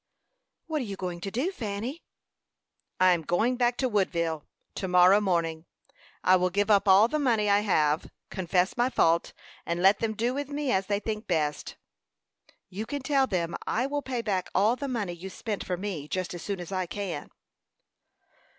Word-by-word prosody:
"What 315 -3 -2
are - - -3
you 200 -2 -5
going 180 -2 -5
to 195 - -3
do, 260 - -1
Fanny?" 235 - -5 1.0
"I 185 0 +6
am 175 -2 +2
going 215 +10 +1
back 240 -1 +1
to 260 - +1
Woodville 170 -8 -1 0.3
to 190 - -4
morrow 180 +3 +6
morning. 170 -4 -1 0.6
I 185 0 +6
will 180 0 +1
give 205 +3 +1
up 200 0 +4
all 195 +3 +7
the 305 +5 -1
money 230 -7 +2
I 200 - +5
have, 155 -7 +1 0.2
confess 185 0 0
my 245 +1 +2
fault, 170 -8 +2 0.3
and 170 +1 -2
let 195 +1 +5
them 220 -1 -1
do 235 +4 0
with 285 +1 -4
me 290 -2 -2
as 190 0 +1
they 205 -1 0
think 215 0 -4
best." 150 -4 -1 0.9
"You 210 +4 -6
can 285 -2 -4
tell 270 -1 +2
them 170 -5 -1
I 240 +4 +1
will 290 +1 -2
pay 250 -4 -3
back 190 -4 -1
all 210 +6 +4
the 280 +2 -5
money 215 -9 -2
you 175 +3 -8
spent 210 +2 -4
for 180 -1 -3
me, 180 -6 -5
just 185 +2 -3
as 175 - -7
soon 200 -2 -4
as 175 +1 -7
I 185 -2 -1
can." 195 0 -5
200 Hz, 190 wpm, -28 LUFS, 180-240 Hz, 1.0 s, all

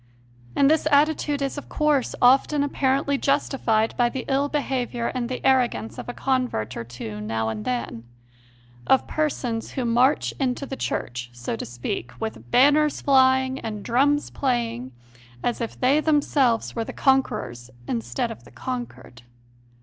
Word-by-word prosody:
And 275 - +4
this 310 +1 +3
attitude 290 -1 +2
is, 275 +1 -2
of - - -14
course, 300 -4 +1
often 275 +3 +5
apparently 275 0 0
justified 250 -6 +1
by 240 -1 +3
the 255 0 -5
ill 280 +1 +1
behaviour 255 -5 -2
and 245 -2 -2
the 255 - -5
arrogance 250 -4 +1
of - - -7
a - - -4
convert 255 - -1
or - - -4
two 115 -3 -7
now 110 +1 -2
and 105 -1 -5
then 120 -2 -3 0.8
of 265 - +4
persons 250 -7 -2
who 255 - -2
march 245 +5 +2
into 265 0 -1
the 270 - -5
Church, 120 - -3
so 120 -1 -4
to - - -6
speak, 120 0 -5
with 220 - -6
banners 290 - +4
flying 260 -1 +3
and 215 -2 -5
drums 285 +5 +2
playing, 235 - -1 0.5
as 240 - -1
if 230 - -5
they 265 +4 +4
themselves 290 -6 +1
were 230 - -1
the - - -7
con 270 0 +4
^querors 120 - -7 0.2
instead 120 +1 -2
of 120 - -10
the 120 - -16
conquered. 240 - -7
255 Hz, 155 wpm, -24 LUFS, -, 0.8 s, often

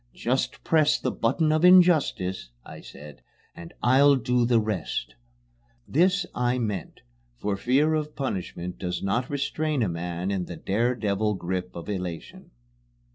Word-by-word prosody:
"Just 130 +3 -2
press 155 -2 +3
the 130 - -2
button 155 +7 +1
of 155 +2 +1
Injustice," 160 - +4 0.2
I - - -10
said, 75 -2 -12 0.3
"and 85 0 -10
I'll 140 +4 +5
do 125 -1 +1
the 120 -2 +4
rest!" 95 - -3 0.7
This 180 +5 +2
I 125 +1 0
meant, 105 -8 -4 0.4
for 100 +8 -2
fear 135 +9 +2
of 150 -1 -2
punishment 90 -8 -4
does 90 -1 -4
not 120 +6 -1
restrain 145 0 -1
a - - +1
man 85 +2 -3
in 95 -3 -2
the 85 - -8
dare 115 +6 0
devil 105 -1 -1
grip 90 0 -4
of 85 - -8
elation. 90 -5 -6
115 Hz, 145 wpm, -26 LUFS, 90-140 Hz, 0.7 s, I'll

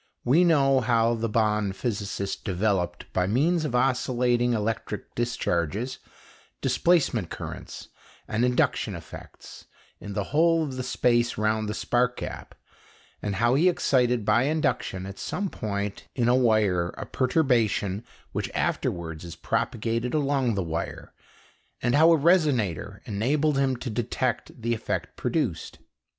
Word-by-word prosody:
We 150 +9 +5
know 140 -6 +4
how 115 -1 +2
the 115 0 -2
Bonn 105 -2 +1
physicist 100 -2 -3
developed, 95 -2 -1
by 90 0 +1
means 155 - +2
of 130 -5 -2
oscillating 125 -1 +2
electric 110 -1 -3
discharges, 115 - -1 0.6
displacement 140 - +2
currents - - -8 0.4
and 110 +2 0
induction 125 0 +1
effects - - -11 0.3
in 100 - -7
the 100 - -1
whole 165 +1 +4
of 140 -4 -4
the 130 - -3
space 120 -1 +1
round 110 0 0
the 105 - -3
spark 125 +2 +1
gap; - - -7 0.7
and 100 -2 -2
how 120 +4 +3
he 165 +7 +4
excited 125 - +1
by 115 +5 +3
induction 145 -10 -1
at 100 0 -8
some 200 -1 -3
point 100 -1 -4
in 120 -3 +1
a 120 - +5
wire 110 -8 +3
a - - -5
perturbation 120 - +1 0.3
which - - -3
afterwards 80 -2 -2
is 85 -1 -8
propagated 115 - -1
along 140 -5 +1
the 95 - 0
wire, 80 0 -5 0.7
and 120 - 0
how 160 +4 +6
a 165 - +6
resonator 130 - +1
enabled 135 +7 +1
him 135 -1 +2
to 120 0 -5
detect 120 +1 -2
the 115 0 +1
effect 110 - -3
produced. - - -2
120 Hz, 135 wpm, -26 LUFS, 105-135 Hz, 0.7 s, how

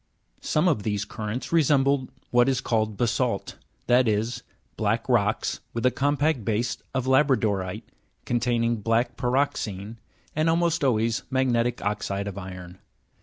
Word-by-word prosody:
2. - - -9
Some 155 +4 +2
of 150 -11 +2
these 105 0 -2
currents 110 +4 -5
resemble 140 -4 +3 0.2
what 120 +1 +4
is 130 - +1
called 110 -3 -1
basalt, 120 -1 -1 0.3
that 125 0 +4
is, 110 +2 0 0.3
black 110 +2 0
rocks 110 -4 +1 0.2
with 115 +1 -1
a 125 - +5
compact 145 -1 +1
base 110 +3 0 0.2
of 130 -1 0
la'bradorite, 115 -8 +2 0.4
containing 120 -1 +1
black 115 +3 0
pyroxene, 115 -5 -1 0.4
and 155 +2 +2
almost 170 -1 +1
always 115 -3 +1
magnetic 120 -4 +1
oxide 100 -1 -2
of 100 -1 -5
iron. 90 -1 -9
120 Hz, 135 wpm, -25 LUFS, 105-130 Hz, 0.4 s, a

